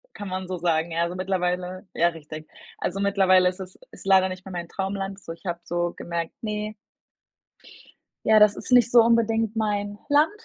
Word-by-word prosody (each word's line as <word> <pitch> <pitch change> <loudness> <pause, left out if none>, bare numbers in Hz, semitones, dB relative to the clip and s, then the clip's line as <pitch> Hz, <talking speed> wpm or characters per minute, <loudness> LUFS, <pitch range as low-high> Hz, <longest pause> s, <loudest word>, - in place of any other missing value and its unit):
Kann 205 - -7
man 185 0 -4
so 185 -1 -4
sagen, 165 -1 0
ja, 165 +1 -1
also, 170 +1 -3
mittlerweile 185 0 -2
ja 170 +1 +3
richtig. 155 -1 -10 0.3
Also, 190 +2 -3
mittlerweile 190 -2 +4
ist 180 - -9
es 185 -1 -9
ist - - -13
leider 190 -1 +5
nicht 185 0 -8
mehr 190 - -8
mein 175 -1 -5
Traumland. 195 0 -4
So 170 - -9
ich 165 - -18
habe 170 -1 -3
so 175 0 -2
gemerkt, 170 -1 -4
ne 210 0 -3 1.5
ja, 220 0 +6
das 210 -1 +5
ist - - -6
nicht 245 -1 +6
so 240 -1 +7
unbedingt 225 -1 +2
mein 205 -1 -1
Land, 295 +2 +4
190 Hz, 190 wpm, -25 LUFS, 175-210 Hz, 1.5 s, so